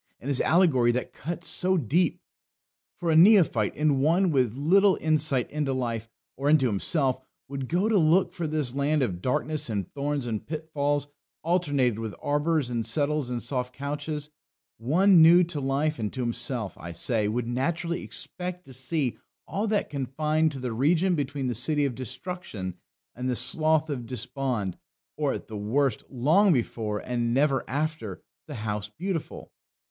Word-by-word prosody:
And 135 - -6
his 140 - +2
allegory 155 -9 +4
that 125 - -3
cuts 170 +2 -6
so 185 +4 +1
deep! 160 - +1 0.8
For 170 -2 -1
a - - +3
neophyte, 165 - +5
and 150 -2 +2
one 170 +5 +3
with 125 -6 +1
little 190 +7 +4
insight 155 -5 +2
into 150 -3 -1
life, 115 -3 -3 0.3
or 140 +2 -1
into 150 -3 +5
himself, 130 - +1 0.3
would 135 -1 -5
go 180 +5 +1
to 220 -3 +3
look 175 +3 +3
for 175 -3 -3
this 150 -5 -1
land 140 +1 +1
of 90 -7 -3
darkness 150 +3 0
and 100 -5 -2
thorns 145 -1 -2
and 110 -3 -3
pitfalls, 145 -2 -2 0.4
alternated 145 - +1
with 110 -2 -5
arbours 145 -2 0
and 115 -1 -1
settles 145 +2 0
and 120 -2 -3
soft 125 -2 -3
couches 145 +1 -4 0.5
one 170 - +5
new 170 +3 +8
to 165 -3 -3
life 140 +2 0
and 105 -2 -2
to 130 - -3
himself, 120 -3 -2
I 85 0 -7
say, 110 +4 0
would 115 +3 -1
naturally 165 +8 -1
expect 180 0 -5
to 135 - -12
see 130 +1 -1 0.3
all 210 +3 -2
that 210 -1 0
confined 150 +3 0
to 135 - -6
the 125 -2 -3
region 165 +9 +2
between 145 -3 -2
the 125 - 0
City 145 +6 +1
of 135 - -1
Destruction 130 - -6 0.4
and 125 +1 -3
the 125 - 0
Slough 155 +5 +3
of 125 -5 -4
Despond; 125 -6 -3 0.4
or, - - 0
at - - -7
the 110 - -6
worst, 120 +4 0
long 160 +11 +3
before, 110 -4 -2
and 120 +1 -2
never 135 -1 +2
after, 145 - -3 0.2
the 150 - -7
House 105 -2 -3
Beautiful. 170 - -5
140 Hz, 165 wpm, -26 LUFS, 125-160 Hz, 0.8 s, new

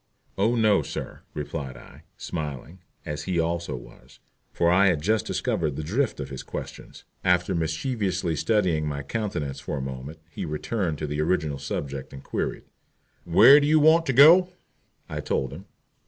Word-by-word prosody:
"Oh 110 +5 +2
no, 110 -4 +4
sir," - - -7
replied 70 -3 -5
I, - - -15
smiling, 75 +3 -6 0.3
as 75 0 -5
he 90 -2 0
also 85 +1 -1
was, - - -14 0.3
for 85 0 +2
I 95 +2 +5
had 90 -5 +2
just 110 +4 +1
discovered 75 -5 -1
the 75 - -4
drift 115 - -1
of 70 -1 -6
his 65 - -6
questions. - - -8 0.2
After 90 0 +2
mischievously 90 - -1
studying 90 -5 +1
my 70 -1 -4
countenance 75 -7 -3
for 75 - -4
a - - -3
moment, 65 +4 -7
he 80 - -7
returned 80 +2 -2
to 75 - -4
the 75 +1 -2
original 75 -4 0
subject 70 -1 -5
and 70 - -10
queried, - - -3 0.6
"Where 135 - +8
do 145 - 0
you 155 +1 +5
want 160 +2 +5
to 135 - +1
go?" 165 +8 +8 0.6
I - - -5
told 65 - -2
him. 90 +7 -10
85 Hz, 170 wpm, -25 LUFS, 75-105 Hz, 0.6 s, Where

